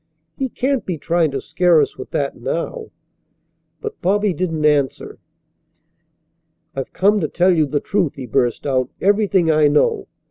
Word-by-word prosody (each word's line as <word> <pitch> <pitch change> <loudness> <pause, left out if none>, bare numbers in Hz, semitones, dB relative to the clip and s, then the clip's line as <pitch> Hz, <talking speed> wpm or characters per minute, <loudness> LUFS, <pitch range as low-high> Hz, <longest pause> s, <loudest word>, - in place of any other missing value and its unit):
He 265 -1 -2
can't 265 +1 -1
be 180 -3 -4
trying 165 +1 +1
to 135 -1 -3
scare 175 +2 +2
us - - 0
with - - -9
that - - -2
now." 470 -3 -4 0.9
But 440 -1 -7
Bobby 205 +1 +1
didn't 165 -4 -2
answer. 145 -3 0 1.6
"I've 135 -1 -4
come 205 +2 +2
to 155 - -1
tell 180 +4 +2
you 155 -2 +2
the 145 +1 -1
truth," 185 -5 -1
he 135 - -7
burst 120 0 0
out, 130 -2 0
"everything 200 -4 +2
I 155 -1 +4
know. 145 +1 +1
170 Hz, 155 wpm, -19 LUFS, 145-200 Hz, 1.6 s, I